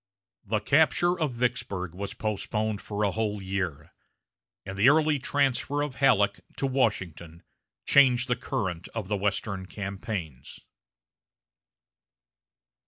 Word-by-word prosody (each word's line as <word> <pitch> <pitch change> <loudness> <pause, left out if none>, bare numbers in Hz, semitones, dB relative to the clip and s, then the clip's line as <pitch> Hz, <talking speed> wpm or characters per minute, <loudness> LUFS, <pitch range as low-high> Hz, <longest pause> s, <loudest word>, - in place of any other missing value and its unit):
The 110 +1 0
capture 155 +7 +3
of 155 -5 0
Vicksburg 100 -7 -2
was 100 +2 -5
postponed 110 0 -2
for 105 0 -3
a 100 - +2
whole 105 0 -1
year, 95 -6 -4 0.7
and 95 0 -6
the 105 +7 +6
early 155 -1 +3
transfer 140 +1 0
of 140 -3 -5
Halleck 105 -7 +3 0.2
to - - 0
Washington 95 - -1 0.4
changed 130 -2 +5
the 125 - +1
current 90 -7 -3
of 105 -3 -4
Western 100 -1 -1
campaigns. 95 - -6
105 Hz, 110 wpm, -27 LUFS, 95-130 Hz, 0.7 s, the